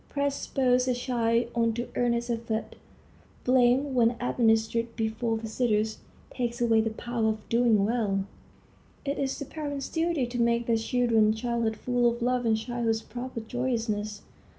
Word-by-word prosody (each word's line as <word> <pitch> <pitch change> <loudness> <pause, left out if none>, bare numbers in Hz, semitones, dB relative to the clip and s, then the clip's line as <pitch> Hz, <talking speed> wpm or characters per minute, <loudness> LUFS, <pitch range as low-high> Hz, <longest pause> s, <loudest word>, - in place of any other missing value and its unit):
Praise 280 -1 0
spurs 255 -2 +1
a 250 - +2
child 235 -1 0
on 230 -1 +2
to 240 +2 -3
earnest 240 0 0
effort; 225 -1 -3 0.7
blame, 255 +2 +3
when 240 -1 +3
administered 230 -1 +1
before 225 0 -1
visitors, 220 -1 0 0.3
takes 240 -1 -3
away 230 -2 +4
the 225 - 0
power 230 0 -2
of 215 -1 -4
doing 230 -4 +3
well. 205 -4 0 0.8
It 280 0 -2
is 270 -1 -1
the 280 - -5
parents' 285 -2 -5
duty 330 -5 0
to 240 0 -2
make 235 0 +2
their 230 -1 +2
children's 225 -2 +2
childhood 235 -2 -1
full 245 0 +2
of 235 0 -4
love 250 -1 +1
and 220 -1 +3
childhood's 225 -1 -1
proper 245 -1 -6
joyousness. 220 -3 -2
235 Hz, 150 wpm, -28 LUFS, 225-245 Hz, 0.8 s, away